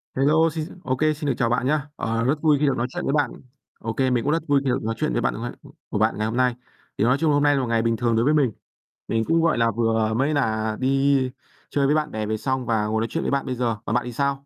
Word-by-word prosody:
Hello 155 Hz, +5 st, +3 dB
xin 160 Hz, +3 st, -6 dB
ô 130 Hz, -, 0 dB
kê, 155 Hz, +1 st, +2 dB
xin 150 Hz, 0 st, -5 dB
được 135 Hz, -, +2 dB
chào 115 Hz, -1 st, +1 dB
bạn 120 Hz, +1 st, 0 dB
nhá. 150 Hz, 0 st, 0 dB
Ờ, 115 Hz, 0 st, -1 dB
rất 135 Hz, +5 st, +2 dB
vui 150 Hz, -3 st, +4 dB
khi 150 Hz, -, +2 dB
được 135 Hz, -2 st, +1 dB
nói 120 Hz, +1 st, 0 dB
chuyện -, -, -5 dB
với 135 Hz, -, 0 dB
bạn. 145 Hz, -1 st, +1 dB, 0.5 s
Ô 115 Hz, -, -4 dB
kê, 130 Hz, +2 st, +1 dB
mình 120 Hz, -2 st, +1 dB
cũng -, -, +1 dB
rất 165 Hz, -, 0 dB
vui 140 Hz, -1 st, +3 dB
khi 135 Hz, -, 0 dB
được 125 Hz, -, 0 dB
nói 115 Hz, +1 st, -2 dB
chuyện 155 Hz, +3 st, -1 dB
với 120 Hz, -, 0 dB
bạn 115 Hz, -, -1 dB
ngày 120 Hz, -, -4 dB, 0.4 s
của 105 Hz, -, -2 dB
bạn 110 Hz, +2 st, +1 dB
ngày 110 Hz, +1 st, -1 dB
hôm 115 Hz, +2 st, -3 dB
nay. 125 Hz, -2 st, +2 dB, 0.4 s
Thì -, -, +1 dB
nói 125 Hz, +4 st, +3 dB
chung 155 Hz, +1 st, +2 dB
hôm 145 Hz, 0 st, +2 dB
nay 145 Hz, -1 st, +4 dB
là 135 Hz, -, +1 dB
một 125 Hz, -, -2 dB
ngày 115 Hz, -1 st, +1 dB
bình 115 Hz, 0 st, 0 dB
thường 120 Hz, -1 st, +1 dB
đối 115 Hz, +2 st, +2 dB
với 150 Hz, -, +3 dB
mình. 140 Hz, -6 st, +3 dB, 0.6 s
Mình 115 Hz, 0 st, 0 dB
cũng, 165 Hz, +1 st, +2 dB
gọi 165 Hz, -5 st, +2 dB
là, 115 Hz, -1 st, +2 dB
vừa 110 Hz, 0 st, +1 dB
mới 135 Hz, +7 st, +1 dB
là 110 Hz, -6 st, 0 dB
đi 135 Hz, 0 st, +2 dB, 0.4 s
chơi 140 Hz, -1 st, +1 dB
với 145 Hz, +2 st, +3 dB
bạn 155 Hz, -1 st, 0 dB
bè 110 Hz, 0 st, -3 dB
về 110 Hz, +1 st, -1 dB
xong 130 Hz, +2 st, -2 dB
và 110 Hz, -3 st, +1 dB
ngồi 110 Hz, +1 st, 0 dB
nói 115 Hz, -, -1 dB
chuyện -, -, -2 dB
với -, -, -1 dB
bạn 140 Hz, 0 st, 0 dB
bây 130 Hz, -, -3 dB
giờ. 120 Hz, -2 st, -1 dB
Còn 110 Hz, -, -1 dB
bạn 125 Hz, -, +1 dB
thì 125 Hz, -, -6 dB
sao? 140 Hz, +2 st, -1 dB
130 Hz, 310 wpm, -23 LUFS, 115-145 Hz, 0.6 s, vui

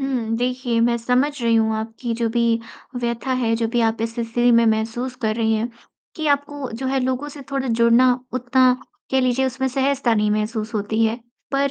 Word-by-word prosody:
हुँ, 245 Hz, -5 st, -1 dB
देखिए 245 Hz, -1 st, -1 dB
मैं 235 Hz, 0 st, +3 dB
समझ 250 Hz, +5 st, +1 dB
रही 230 Hz, -1 st, +3 dB
हूँ 220 Hz, -1 st, +2 dB
आपकी 225 Hz, +2 st, -4 dB
जो 230 Hz, 0 st, 0 dB
भी 235 Hz, 0 st, +1 dB, 0.6 s
व्यथा 235 Hz, +2 st, -2 dB
है, 235 Hz, -3 st, +1 dB
जो 230 Hz, -, 0 dB
भी 240 Hz, +1 st, 0 dB
आप 225 Hz, -1 st, +1 dB
इस 225 Hz, 0 st, -2 dB
स्थिति 240 Hz, +1 st, +1 dB
में 230 Hz, 0 st, +5 dB
महसूस 225 Hz, +3 st, -1 dB
कर 215 Hz, -1 st, +1 dB
रही 225 Hz, -1 st, +2 dB
हैं, 230 Hz, +2 st, -1 dB, 0.5 s
कि 315 Hz, -1 st, -3 dB
आपको 285 Hz, -2 st, -1 dB
जो 250 Hz, +4 st, -4 dB
है 265 Hz, 0 st, +1 dB
लोगों 260 Hz, +3 st, -1 dB
से 285 Hz, -1 st, -10 dB
थोड़ा 270 Hz, -2 st, -2 dB
जुड़ना 235 Hz, +2 st, +4 dB, 0.2 s
उतना 255 Hz, 0 st, +3 dB, 0.4 s
कह 265 Hz, 0 st, +3 dB
लीजिए 255 Hz, +1 st, +1 dB
उसमें 260 Hz, +1 st, -2 dB
सहजता 270 Hz, -2 st, +1 dB
नहीं 210 Hz, -1 st, +1 dB
महसूस 215 Hz, +1 st, -2 dB
होती 220 Hz, +2 st, 0 dB
है। 225 Hz, +1 st, +1 dB, 0.4 s
पर 275 Hz, 0 st, +2 dB
240 Hz, 200 wpm, -21 LUFS, 225-260 Hz, 0.6 s, में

